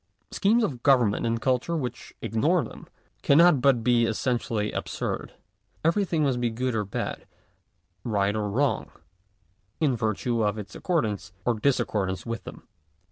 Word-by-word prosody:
Schemes 225 +4 +3
of 130 - -2
government 120 -6 +3
and 115 0 0
culture 130 +7 0
which 125 -5 -6
ignore - - +2
them, - - -10 0.3
cannot 155 -1 +5
but 130 -4 +3
be 120 -1 +4
essentially 115 -2 -1
absurd. - - -4 0.5
Everything 170 -2 +2
must 130 -4 +1
be 120 - +1
good 125 +2 -2
or 110 -2 0
bad, 100 - -5 0.8
right 100 -3 0
or 105 -1 -1
wrong, 130 +7 0 0.9
in 145 -6 +2
virtue 115 +1 -1
of 105 0 +1
its 105 -2 -7
accordance 110 - -2
or 120 - +3
discordance 105 -7 0
with 115 0 -5
them. - - -10
120 Hz, 140 wpm, -26 LUFS, 110-140 Hz, 0.9 s, cannot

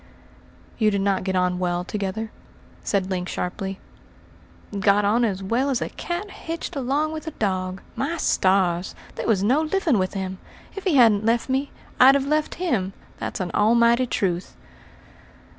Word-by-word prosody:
"You 215 -2 +4
did 200 -1 0
not 195 -1 +1
get 190 0 -1
on 180 0 +1
well 175 -1 0
together?" 210 +3 -4 0.5
said 195 -2 0
Link 180 -1 -2
sharply. 190 +2 -4 1.0
"Got 200 +1 +3
on 225 +4 +3
as 195 -4 -1
well 240 +8 +1
as 260 -3 +1
a - - -3
cat 355 +4 -5
hitched 330 -1 -6
along 280 +4 0
with 315 +1 -6
a 320 - -6
dog. 185 -2 -2
My 315 +5 -2
stars! 185 - +2 0.2
there - - -4
was 200 -4 +2
no 260 +9 +3
living 315 - +1
with 185 +2 -1
him. 190 -1 -4 0.4
If 395 - -7
he 360 -6 +2
hadn't 225 -5 +5
left 230 +3 +1
me, 270 +2 0 0.3
I'd 265 +2 +8
have 275 -1 +1
left 305 +1 0
him 225 - -1 0.3
that's - - -4
an 180 -2 -3
almighty 235 +3 +4
truth." 180 -5 -2
215 Hz, 165 wpm, -24 LUFS, 190-275 Hz, 1.0 s, I'd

